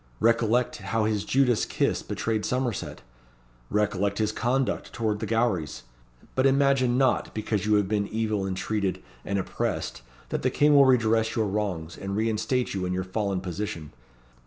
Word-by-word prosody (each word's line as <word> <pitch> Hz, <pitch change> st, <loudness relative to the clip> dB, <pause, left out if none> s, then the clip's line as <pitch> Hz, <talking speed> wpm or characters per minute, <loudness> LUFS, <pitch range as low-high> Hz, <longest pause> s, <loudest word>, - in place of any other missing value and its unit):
Recollect 115 Hz, +1 st, +2 dB
how 105 Hz, +2 st, -1 dB
his 105 Hz, -2 st, 0 dB
Judas 125 Hz, 0 st, +2 dB
kiss -, -, 0 dB
betrayed 110 Hz, -2 st, -2 dB
Somerset. 125 Hz, -3 st, -2 dB, 0.7 s
Recollect 100 Hz, -1 st, 0 dB
his 110 Hz, -1 st, +1 dB
conduct 125 Hz, +4 st, -1 dB
towards 110 Hz, -2 st, -1 dB
the -, -, -3 dB
Gowries. 110 Hz, -, 0 dB, 0.5 s
But 130 Hz, +1 st, +3 dB
imagine 135 Hz, -2 st, +3 dB
not, 130 Hz, -3 st, +2 dB
because 105 Hz, -1 st, -1 dB
you 105 Hz, -, +4 dB
have 105 Hz, -2 st, +2 dB
been 100 Hz, 0 st, 0 dB
evil 110 Hz, -3 st, -1 dB
intreated 95 Hz, +1 st, -2 dB, 0.2 s
and 100 Hz, -, -2 dB
oppressed, 95 Hz, -, -3 dB, 0.3 s
that -, -, -2 dB
the -, -, +2 dB
King 150 Hz, 0 st, +3 dB
will 140 Hz, -1 st, +7 dB
redress 115 Hz, -3 st, +3 dB
your 110 Hz, -, +1 dB
wrongs, 95 Hz, -6 st, -3 dB
and 100 Hz, 0 st, -4 dB
reinstate 115 Hz, +3 st, 0 dB
you 95 Hz, -2 st, -2 dB
in 90 Hz, -, -2 dB
your 95 Hz, 0 st, -1 dB
fallen 95 Hz, 0 st, -2 dB
position. 90 Hz, -4 st, -5 dB
110 Hz, 160 wpm, -26 LUFS, 100-120 Hz, 0.7 s, will